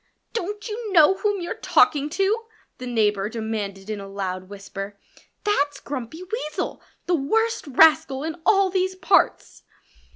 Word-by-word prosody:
"Don't 415 0 -4
you 435 -1 -5
know 325 +1 +7
whom 405 0 -1
you're 345 - -3
talking 295 -1 +3
to?" 400 +7 0 0.3
the 250 - -6
neighbor 210 -4 +1
demanded 215 -4 -4
in 215 -1 -4
a 195 - -8
loud 185 -1 -4
whisper. 200 0 -8 0.4
"That's 290 -10 +1
Grumpy 285 +4 -6
Weasel 360 -6 -4 0.2
the 360 - 0
worst 445 +8 0
rascal 300 -1 +4
in 320 +1 -5
all 390 -1 +4
these 375 0 0
parts." 370 - +1
300 Hz, 140 wpm, -24 LUFS, -, 0.4 s, know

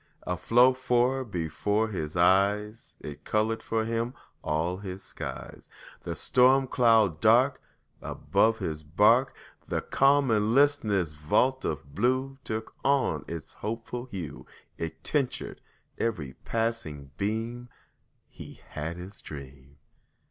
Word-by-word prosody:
Afloat 120 +8 +3
fore'er 130 +1 +2
before 100 - -1
his 80 -5 -4
eyes, 100 +5 +2
It 75 0 -8
colored 110 +1 0
for 110 -1 -1
him 115 +2 -2 0.3
all 85 +4 -1
his 95 -1 -7
skies: - - -8 0.3
The - - -5
storm 130 +2 +4
cloud 115 - +3
dark 125 +5 +4 0.4
Above 110 0 +1
his 80 -7 -4
bark, 105 - +3 0.3
The - - -1
calm 140 -1 +3
and 110 +1 +2
listless 110 - +3
vault 125 - +1
of 70 -2 -4
blue 130 - 0
Took 110 0 -4
on 140 -1 +1
its 85 -2 -7
hopeful 115 +3 -5
hue, 95 - -7 0.3
It 80 -1 -6
tinctured 140 -4 -1 0.4
every 80 -13 -2
passing 110 -12 -2
beam 115 +4 -3 0.6
He - - -12
had 80 +3 -5
his 95 +3 -10
dream. 70 -1 -11
110 Hz, 120 wpm, -28 LUFS, 85-125 Hz, 0.6 s, storm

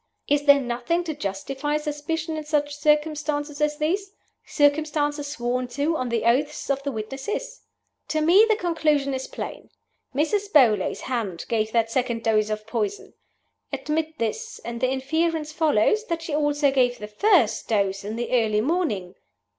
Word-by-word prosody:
Is 290 0 +2
there 285 0 +8
nothing 245 +7 -1
to 325 -2 -3
justify 275 +6 -3
suspicion 305 +2 -3
in 310 - -4
such 295 -1 0
circumstances 300 0 0
as 300 0 +1
these 380 +6 -1 0.3
circumstances 290 0 +1
sworn 250 -3 -2
to 300 +3 +1
on 255 -5 -2
the 235 -1 0
oaths 280 +6 +1
of 275 0 -1
the 280 0 -3
witnesses? 270 - -5 0.5
To 310 - 0
me 345 +7 +6
the 435 - +5
conclusion 310 -7 +1
is 260 0 -3
plain. - - -7 0.5
Mrs. 400 +8 0
Beauly's 225 -10 +4
hand 220 -9 -3
gave 220 -1 0
that 230 -1 +2
second 240 -2 -1
dose 215 -1 +2
of 215 0 -3
poison. 210 -3 -3 0.6
Admit 310 +3 -2
this; 450 - -3
and 235 0 -5
the 255 - +2
inference 310 +4 -1
follows 310 - +2
that 335 -1 -2
she 330 - -5
also 290 -1 +2
gave 250 -2 +2
the 210 - -7
first 280 - +2
dose 200 -2 0
in 210 +2 -4
the 240 +1 -4
early 220 -4 +2
morning. 235 - -1
290 Hz, 160 wpm, -24 LUFS, 235-310 Hz, 0.6 s, there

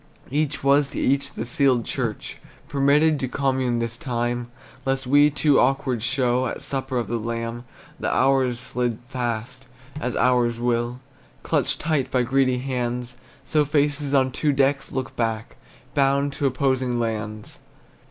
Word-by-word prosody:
Each 150 0 -1
was 140 +1 +4
to - - -5
each 140 +1 +1
the 115 - -4
sealed 130 -3 +2
church, - - -3 0.3
Permitted 145 +2 +3
to 130 - -1
commune 130 -2 0
this 115 0 -3
time, 120 -1 -2 0.3
Lest 135 0 -1
we 145 +3 +5
too 145 0 +3
awkward 130 -2 +1
show 125 +1 +1
At - - -5
supper 135 -1 -2
of 120 - 0
the 120 - -2
Lamb. 115 +1 -4 0.3
The - - -1
hours 130 -2 +2
slid 125 -2 -2
fast, 125 +1 -4 0.3
as 125 -5 -3
hours 120 -1 +2
will, 120 +1 -1 0.4
Clutched - - 0
tight 150 -4 0
by 125 -1 +2
greedy 130 0 +2
hands; 125 -1 -3 0.3
So 150 +2 +2
faces 145 -1 0
on 130 -2 +3
two 150 +3 +1
decks 140 0 +1
look 130 -1 -4
back, 115 -1 -2 0.4
Bound 140 0 +2
to 140 - 0
opposing 130 -2 0
lands. 110 -2 -4
130 Hz, 150 wpm, -24 LUFS, 120-140 Hz, 0.4 s, we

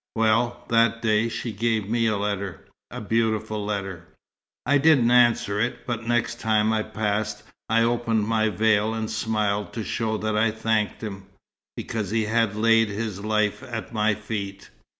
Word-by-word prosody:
Well, 115 +2 +1
that 115 0 +2
day 110 +1 +2
she 115 +1 -4
gave 110 -1 -1
me 115 +1 +1
a 110 -2 +1
letter 100 -2 -3 0.3
a - - -7
beautiful 110 -1 -1
letter. 95 -5 -4 0.6
"I 145 +3 +3
didn't 135 -5 +4
answer 120 -4 +3
it; 120 +3 -2
but 115 -2 -4
next 120 0 0
time 110 0 +2
I 110 - +1
passed, 105 -1 -2 0.3
I 115 +1 +3
opened 115 -2 0
my 110 -1 +2
veil 110 0 +2
and 110 -1 -3
smiled 105 -2 -1
to 115 - -4
show 110 0 -2
that 110 0 -2
I 110 +1 +3
thanked 110 0 -1
him. 100 -3 -7 0.5
Because 110 -5 -3
he 110 0 0
had 110 -1 +1
laid 115 0 +3
his 100 -1 -4
life 105 -1 0
at 115 -1 -6
my 105 -1 +2
feet. 100 -2 -6
110 Hz, 165 wpm, -24 LUFS, 105-115 Hz, 0.6 s, didn't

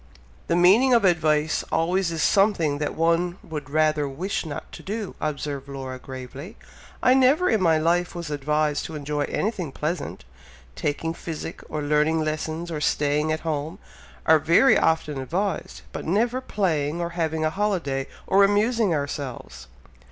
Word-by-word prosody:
"The 170 - +1
meaning 210 +9 +5
of 230 -4 +3
advice 155 -3 +2
always 175 +2 +1
is 160 -2 -1
something 170 -8 +2
that 150 - -2
one 170 +2 +1
would 150 -3 -7
rather 155 -1 +2
wish 170 +5 -3
not 145 - -7
to - - -10
do," 210 0 -4
observed 145 -2 -3
Laura, 130 -2 -6
gravely. 130 +6 -9 0.5
"I 255 - +6
never 270 +7 +4
in 220 -3 +2
my 165 -3 +4
life 175 +3 +1
was 170 -3 -5
advised 150 +1 0
to 160 - -7
enjoy 145 0 -2
anything 195 -8 -2
pleasant! 155 - -4 0.5
Taking 165 +3 -2
physic 165 -1 -6
or 150 -1 -3
learning 150 +2 +2
lessons 155 +2 -3
or 150 -2 -3
staying 150 +1 +1
at 155 - -1
home, 155 +2 -3 0.5
are 160 0 +6
very 170 - +5
often 160 -3 +1
advised, 180 +6 -3
but - - -6
never 235 +9 +1
playing 165 - -1
or 170 0 -2
having 160 -2 -1
a 155 - +1
holiday 165 -9 -1 0.2
or 200 +1 +4
amusing 205 -1 +2
ourselves!" 135 - -5
160 Hz, 155 wpm, -24 LUFS, 150-185 Hz, 0.5 s, I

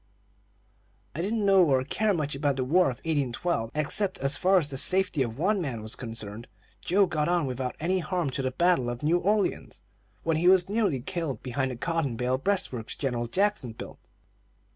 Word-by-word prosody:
"I 165 - -3
didn't 210 +3 -1
know 195 -2 +6
or 135 -5 +2
care 215 +10 0
much 155 -6 -1
about 140 0 0
the 130 - -1
War 175 +8 +3
of 125 - -5
1812, 145 -3 -1
except 155 +7 0
as 135 +1 0
far 190 +5 +4
as 170 - +2
the 140 - -6
safety 185 +1 +2
of 115 -2 -2
one 195 +5 +1
man 125 -9 -4
was 110 +3 -5
concerned. 115 -2 -6 0.3
Joe 195 +3 +3
got 155 -4 -1
on 175 -3 +2
without 130 -1 -3
any 185 +4 0
harm 170 -3 -2
till 135 +1 -3
the - - +1
battle 135 -2 +2
of 120 +3 -6
New 165 +4 +3
Orleans, 205 +3 -1 0.4
when 165 -1 +1
he 175 +3 +2
was 185 -1 +5
nearly 200 - 0
killed 165 - -4
behind 130 +1 -1
the 125 - -5
cotton 155 -1 -1
bale 125 +2 0
breastworks 135 - -2
General 120 -4 -2
Jackson 190 - 0
built." - - -10
150 Hz, 190 wpm, -27 LUFS, 130-180 Hz, 0.4 s, know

